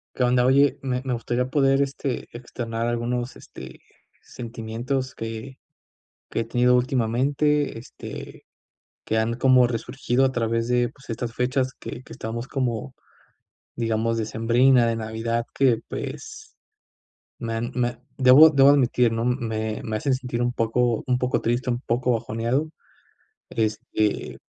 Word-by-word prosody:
Qué 125 - 0
onda. 125 0 +3
Oye, 140 +2 +4
me 125 -1 -1
me 130 -2 -2
gustaría 120 +2 -1
poder, 135 -1 +3
este, 140 -2 -3
externar 115 -1 -4
algunos, 120 +1 -2
este, - - -11 0.4
sentimientos 120 +3 -4
que 115 +4 -6 0.7
que - - -1
he - - 0
tenido 125 +2 +3
últimamente, 135 +3 +1
este, 120 - -10 0.6
que 110 - 0
han 110 +1 0
como 125 0 +5
resurgido 125 +2 0
a 130 - +2
través 115 -1 0
de, 120 0 +2
pues, 135 +2 -19
estas 115 +1 -3
fechas 130 +1 0
que 125 - -7
que - - -13
estábamos 115 +3 -5
como, 130 -2 -2 0.8
digamos, 115 0 0
decembrinas 120 +3 +3
de 115 0 0
Navidad, 115 +1 -2
que, 125 -5 +3
pues, 435 0 -7 0.8
me 115 -1 -4
han 115 +2 -2
me 120 -1 -1 0.2
debo 135 +5 +8
debo 140 -2 +6
admitir, 125 -4 +4
¿no?, 115 0 -1
me 110 -3 -2
me 110 -1 -2
hacen 135 +5 0
sentir 125 -2 -3
un 120 0 0
poco 115 0 +1
un 125 - +2
poco 125 0 0
triste, 120 +2 0
un 120 0 -1
poco 125 0 0
bajoneado, 115 +5 -1 0.8
este, 110 -1 -1
120 Hz, 140 wpm, -24 LUFS, 115-130 Hz, 0.8 s, debo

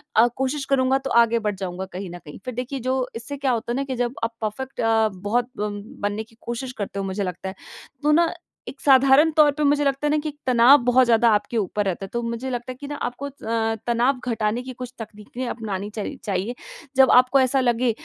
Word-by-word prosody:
अ, 225 +2 +6
कोशिश 265 +2 -2
करूँगा 265 -1 +2
तो - - -1
आगे 230 0 0
बढ़ 210 -2 -2
जाऊँगा 185 0 -5
कहीं 185 0 -5
न 175 - -7
कहीं। 150 - -10
फिर 255 - -4
देखिए 255 +3 -4
जो 260 +2 0 0.2
इससे 280 +5 -6
क्या 270 -1 0
होता 235 0 -2
है - - -1
ना 275 - 0
कि 265 -2 -4
जब 245 0 -1
आप 230 0 -1
परफ़ेक्ट 250 +5 -4
अ, 225 -1 +3
बहुत 240 +4 0
ब 210 0 -1 0.3
बनने 205 +2 -1
की 225 0 -24
कोशिश 245 +2 -4
करते 200 -1 -4
हो 195 - -2
मुझे 195 +1 -2
लगता 180 +1 -4
है। 190 - -9 0.5
तो 300 - +3
ना 335 +2 +3 0.3
एक 270 - -8
साधारण 275 +3 +6
तौर 300 -1 +7
पे 300 +1 -3
मुझे 290 0 +3
लगता 275 +1 0
है - - +1
ना 305 - +3
कि 310 - -3
एक 295 - -12
तनाव 250 +3 +7
बहुत 250 +1 +5
ज़्यादा 235 0 +4
आपके 225 +3 -2
ऊपर 205 0 -1
रहता 195 +1 -2
है - - -9
तो 235 - -1
मुझे 235 +3 -3
लगता 245 +1 -4
है - - -8
कि 285 - -6
ना 290 - -5
आपको 245 +1 -4
अ, 225 -5 -2
तनाव 245 +3 +2
घटाने 220 +1 0
की 255 0 -7
कुछ 250 0 -7
तकनीकें 220 +3 -7
अपनानी 205 -3 -4
चाहि 220 +7 -4
चाहिए। 200 +4 -2 0.4
जब 265 -1 +6
आपको 255 +2 +6
ऐसा 265 +1 +3
लगे 240 -1 +2
240 Hz, 240 wpm, -23 LUFS, 220-265 Hz, 0.5 s, तौर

